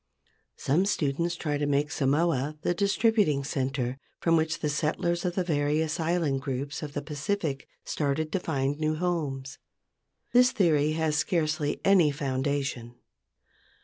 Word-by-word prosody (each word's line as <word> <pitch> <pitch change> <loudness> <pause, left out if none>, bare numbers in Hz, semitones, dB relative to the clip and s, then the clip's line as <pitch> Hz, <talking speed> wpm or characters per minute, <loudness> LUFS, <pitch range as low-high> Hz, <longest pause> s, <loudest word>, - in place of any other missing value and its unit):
Some 170 +8 +1
students 170 -1 0
try 150 -3 -2
to 145 - 0
make 145 +1 +1
Samoa 150 0 +1
the - - +2
distributing 200 -5 +2
centre 135 -1 -2 0.2
from 165 -1 +3
which 160 +1 +1
the 150 - 0
settlers 165 +4 -1
of 175 -1 -1
the 185 - +1
various 155 0 0
island 160 -5 0
groups 140 +1 -4
of 150 -2 -6
the 145 - -3
Pacific 150 0 -3 0.2
started 155 +1 -1
to 190 - 0
find 140 -3 -1
new 155 0 0
homes. 150 -6 -3 0.7
This 250 +1 +6
theory 155 - +3
has 155 -1 0
scarcely 155 -4 0
any 190 -6 +5
foundation. 135 -3 -2
150 Hz, 140 wpm, -28 LUFS, 140-170 Hz, 0.7 s, This